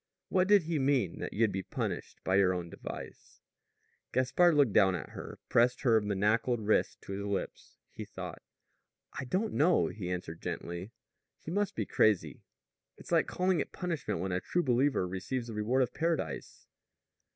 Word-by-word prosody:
"What 185 -1 +3
did 205 -3 +6
he 160 -1 -1
mean 130 -10 +1
that - - -4
you'd 110 0 +2
be 95 - -2
punished - - -5
by 95 +1 +2
your 95 -2 +4
own 85 -1 -5
device?" - - -9 0.7
Gaspard 155 +7 +3
looked 140 -8 +4
down 95 -3 +5
at 90 - -6
her, - - -8
pressed 120 +1 +3
her 115 -5 +4
manacled 105 +4 +1
wrist 110 0 +1
to - - -8
his 100 +1 -3
lips, 100 -1 -4 0.2
took - - -7
thought. - - -7 0.8
"I - - -3
don't 195 - -1
know," 170 +5 +3
he 95 -5 -5
answered 90 -2 -5
gently. 85 +5 -5 0.5
"He 160 - -8
must 205 +1 0
be 110 - -1
crazy. 85 -12 +2 0.6
It's - - -12
like - - +3
calling 185 -1 +1
it - - -3
punishment 170 - -3
when 95 +2 -2
a 90 0 0
true 175 - 0
believer 130 -5 +2
receives 105 +7 -3
the 115 - -7
reward 115 +5 +2
of 125 - -4
paradise." 165 -1 -2
115 Hz, 175 wpm, -31 LUFS, 95-150 Hz, 0.8 s, did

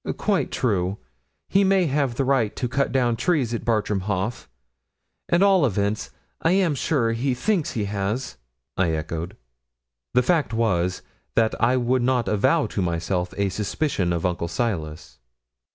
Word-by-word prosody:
'Quite 205 -3 0
true. 100 -5 0 0.5
He 195 +1 +3
may 190 -1 +3
have 140 -4 0
the 135 - 0
right 130 -6 +1
to 125 - -2
cut 135 +3 0
down 120 -3 +2
trees 140 -5 0
at 115 - -3
Bartram 105 -3 0
Haugh. 100 +4 -3 0.8
At 175 +3 +4
all 195 -4 +5
events, 105 -3 0 0.3
I 165 - +3
am 185 -5 +3
sure 130 -4 0
he 125 +3 0
thinks 180 - 0
he 105 -3 -1
has,' 100 - -3 0.4
I 85 -3 +1
echoed. 80 +2 -4 0.8
The 125 - +5
fact 150 -5 +1
was, 90 -6 0 0.3
that 110 -1 +3
I 125 +2 +3
would 125 +1 +1
not 125 -1 +1
avow 130 +10 +2
to 100 - -3
myself 90 +1 -2
a 100 -1 +1
suspicion 100 - -1
of 85 +1 -1
Uncle 85 -1 -1
Silas. 85 -5 -3
115 Hz, 155 wpm, -24 LUFS, 95-135 Hz, 0.8 s, all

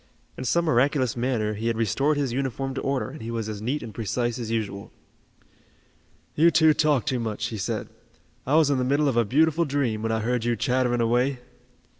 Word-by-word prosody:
In 130 - -6
some 170 +7 +2
miraculous 130 -3 +2
manner 120 -3 -1
he 110 +2 -4
had 115 -1 0
restored 135 +7 +1
his 135 -4 -1
uniform 135 0 -2
to 135 - -4
order 135 -1 -2
and 155 - -10
he 115 - -6
was 115 -2 -3
as 105 -1 -5
neat 130 +6 -2
and 110 -2 -8
precise 115 +3 -2
as 115 -2 -4
usual. 105 -3 -3 1.4
"You 165 +3 +5
two 160 -1 +5
talk 150 -4 +2
too 130 - -1
much," 110 -1 -3
he 110 - -5
said. - - -3 0.6
"I 140 - +2
was 155 -3 +4
in 135 - +1
the - - +1
middle 140 +3 +2
of 135 - 0
a 120 - +4
beautiful 160 +8 +2
dream, 135 -7 -1
when 115 0 -1
I 110 0 0
heard 120 +1 -1
you 120 0 +1
chattering 125 0 +1
away." 125 +4 +1
125 Hz, 210 wpm, -25 LUFS, 115-140 Hz, 1.4 s, You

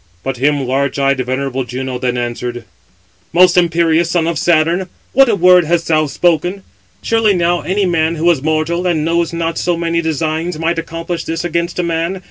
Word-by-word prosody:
But 135 -1 -3
him 140 +1 +1
large 135 +2 -1
eyed, 140 -1 +1
venerable 130 +1 -2
Juno 125 +1 -5
then 125 -1 -1
answered: 120 0 -4 0.7
"Most 180 +1 +5
imperious 170 -1 +2
son 170 -2 +1
of 165 -3 -1
Saturn, 170 +3 +1 0.2
what 270 -1 +5
a 220 - +3
word 180 -1 +5
hast 165 +1 0
thou 155 -1 +2
spoken? 175 +6 0 0.4
Surely 225 -3 +2
now 175 0 +1
any 195 +2 0
man 165 -2 +1
who 165 +2 -1
is 155 -6 -1
mortal, 160 +4 -1
and 160 -3 0
knows 170 0 0
not 165 -1 -2
so 175 -1 0
many 170 0 -1
designs, 160 +1 -2
might 165 +1 -1
accomplish 165 +1 -5
this 165 +1 -3
against 170 0 -2
a 180 - 0
man. 170 +2 -2
165 Hz, 185 wpm, -15 LUFS, 150-175 Hz, 0.7 s, Most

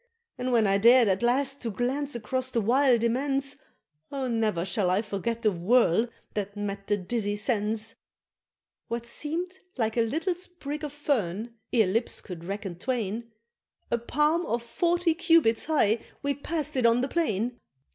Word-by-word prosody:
And 250 0 -1
when 230 -3 +4
I 195 0 +3
dared 240 +2 +7
at 190 0 +1
last 270 +3 +1
to 235 - -2
glance 260 +5 -2
across 255 +3 -2
the 240 - 0
wild 240 +2 +3
immense, 275 +3 0 0.5
Oh 270 -2 -2
ne'er 220 -7 0
shall 190 0 +1
I 190 +4 +2
forget 230 +3 -3
the 215 - +4
whirl 210 +3 +3 0.3
that 205 0 -4
met 200 -1 -4
the 205 - +2
dizzy 205 +1 -2
sense! 215 0 -1 0.9
What 235 0 -3
seem'd 345 +9 -2 0.2
a 225 -1 +1
little 315 - 0
sprig 340 -4 -6
of 295 - -3
fern, 235 - -1 0.2
ere 230 -4 +4
lips 225 +6 0
could 175 -4 -8
reckon 195 -1 -5
twain, 230 -1 -2 0.6
A 235 - +2
palm 300 +8 +1
of 235 0 -1
forty 340 +7 +1
cubits 330 -9 +3
high, 235 -8 +2 0.2
we 280 0 +1
passed 300 +1 -3
it 250 -3 +4
on 230 +1 +3
the 260 - 0
plain! 245 - -1
235 Hz, 160 wpm, -27 LUFS, 210-280 Hz, 0.9 s, dared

